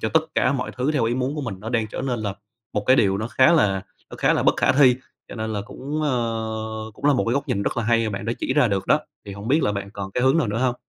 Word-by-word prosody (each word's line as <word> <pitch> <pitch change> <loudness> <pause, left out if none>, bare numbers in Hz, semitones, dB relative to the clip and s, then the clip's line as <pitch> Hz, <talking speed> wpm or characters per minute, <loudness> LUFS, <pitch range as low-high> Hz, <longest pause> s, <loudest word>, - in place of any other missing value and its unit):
cho - - 0
tất 160 0 +2
cả 130 - +2
mọi 125 -2 -2
thứ 130 +5 0
theo 130 -6 +1
ý 120 +2 0
muốn 130 +3 -1
của 150 - -3
mình, 110 -7 -4
nó 110 - -6
đang 115 -2 0
trở - - -5
nên 125 -3 -2
là 100 -2 -3 0.4
một 105 - -2
cái 130 +1 +6
điều 95 -1 +3
nó 110 +2 -3
khá 130 +8 +4
là 95 - +2 0.3
nó - - -8
khá - - +3
là - - +1
bất - - +3
khả - - +3
thi. 130 -2 +5 0.3
Cho - - -8
nên 110 -1 -3
là 100 -1 -2
cũng, 145 +8 -5
ờ, 110 -4 -2
cũng - - -15
là 145 - +5
một - - +1
cái 115 - +1
góc 140 +1 -2
nhìn 100 -5 0
rất - - -2
là 115 - 0
hay 115 0 +2
mà - - -2
bạn 100 - -5
đã 115 - -1
chỉ - - -1
ra 145 -6 +4
được 100 -1 -1
đó, 150 - +4 0.3
thì 100 - -6
hổng 100 +4 -7
biết 150 +4 +3
là 105 - +1
bạn 100 0 -5
còn 100 -2 -6
cái 125 - -1
hướng 130 +5 +4
nào 145 - +2
nữa 105 +2 -2
hông? 125 -1 +1
115 Hz, 325 wpm, -23 LUFS, 105-130 Hz, 0.4 s, cái